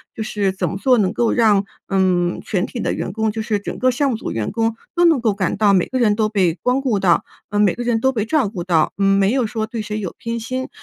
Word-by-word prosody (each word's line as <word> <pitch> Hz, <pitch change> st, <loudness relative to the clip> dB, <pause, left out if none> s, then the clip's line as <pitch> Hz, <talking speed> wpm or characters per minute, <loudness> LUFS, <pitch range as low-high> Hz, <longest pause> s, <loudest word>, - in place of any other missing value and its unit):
就 225 Hz, -, -5 dB
是 205 Hz, -2 st, -1 dB
怎 190 Hz, -, -2 dB
么 190 Hz, -, -4 dB
做 250 Hz, +3 st, +3 dB
能 190 Hz, -2 st, +2 dB
够 235 Hz, 0 st, +1 dB
让 215 Hz, -4 st, +3 dB, 0.3 s
嗯 180 Hz, -2 st, +1 dB
全 195 Hz, -1 st, -1 dB
体 245 Hz, -, -7 dB
的 -, -, -1 dB
员 -, -, -4 dB
工 220 Hz, +1 st, -1 dB
就 220 Hz, -, -4 dB
是 215 Hz, -1 st, -1 dB
整 -, -, -6 dB
个 255 Hz, -, +3 dB
项 270 Hz, +2 st, +1 dB
目 -, -, -1 dB
组 -, -, -5 dB
员 110 Hz, -2 st, -3 dB
工 225 Hz, 0 st, 0 dB, 0.2 s
都 350 Hz, -, +3 dB
能 320 Hz, -5 st, +4 dB
够 225 Hz, -4 st, +1 dB
感 190 Hz, -3 st, -2 dB
到 205 Hz, -2 st, +4 dB
每 185 Hz, -2 st, +2 dB
个 260 Hz, -, -3 dB
人 215 Hz, -4 st, +3 dB
都 215 Hz, -1 st, +1 dB
被 190 Hz, -6 st, +2 dB
光 250 Hz, +2 st, +1 dB
顾 250 Hz, -7 st, 0 dB
到， 185 Hz, -, +3 dB, 0.3 s
呃 205 Hz, -, -2 dB
每 205 Hz, -4 st, +4 dB
个 245 Hz, -, -6 dB
人 235 Hz, -2 st, +1 dB
都 265 Hz, +3 st, +2 dB
被 220 Hz, -5 st, -1 dB
照 270 Hz, -2 st, +1 dB
顾 190 Hz, -4 st, -5 dB
到， 165 Hz, -3 st, +1 dB
嗯 195 Hz, 0 st, +3 dB
没 195 Hz, +2 st, +3 dB
有 255 Hz, -4 st, +1 dB
说 220 Hz, 0 st, -3 dB
对 220 Hz, 0 st, -5 dB
谁 210 Hz, 0 st, -4 dB
有 190 Hz, -4 st, -5 dB
偏 230 Hz, 0 st, -3 dB
心， 255 Hz, +3 st, -4 dB
215 Hz, 300 characters per minute, -20 LUFS, 195-235 Hz, 0.3 s, 能